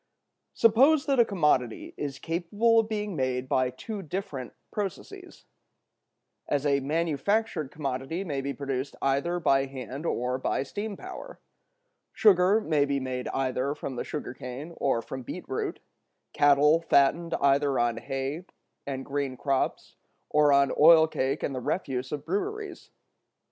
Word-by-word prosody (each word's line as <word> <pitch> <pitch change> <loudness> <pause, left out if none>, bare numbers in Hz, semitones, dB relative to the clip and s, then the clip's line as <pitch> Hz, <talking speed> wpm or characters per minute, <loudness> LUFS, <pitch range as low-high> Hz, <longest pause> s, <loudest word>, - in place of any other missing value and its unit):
Suppose 270 +7 +5
that 275 -3 +1
a 235 - +7
commodity 150 - 0
is 140 -2 -4
capable 205 +9 +1
of 225 -1 0
being 210 -3 -3
made 130 -2 -1
by 130 -1 +1
two 200 - -7
different 150 -7 -5 0.2
processes—as 175 -6 -7
a 140 -1 +3
manufactured 160 +4 0
commodity 140 +4 -4
may 145 -7 -3
be 140 +1 -3
produced 135 -1 -4
either 140 +6 0
by 135 -4 +3
hand 135 +3 -6
or 125 -1 -1
by 130 - -1
steam 205 +8 -5
power—sugar 220 - -1
may 155 -7 +2
be 140 -1 0
made 130 -1 -4
either 135 +1 -1
from 135 - -6
the - - -3
sugar 145 -4 -5
cane 130 +6 -8
or 115 -4 0
from 130 - -6
beet 120 - -8
root, - - -3 0.5
cattle 145 +3 +5
fattened 165 +2 +2
either 140 0 +3
on 120 -1 +1
hay 135 +7 -4 0.4
and 135 -1 -4
green 140 -2 -3
crops 135 0 -2 0.3
or 150 -1 +4
on 140 0 +4
oil 160 +1 +8
cake 140 -2 -2
and 140 - -1
the 130 - -4
refuse 130 -5 -2
of 150 -1 -4
breweries. 405 - -4
145 Hz, 140 wpm, -27 LUFS, 135-180 Hz, 0.5 s, oil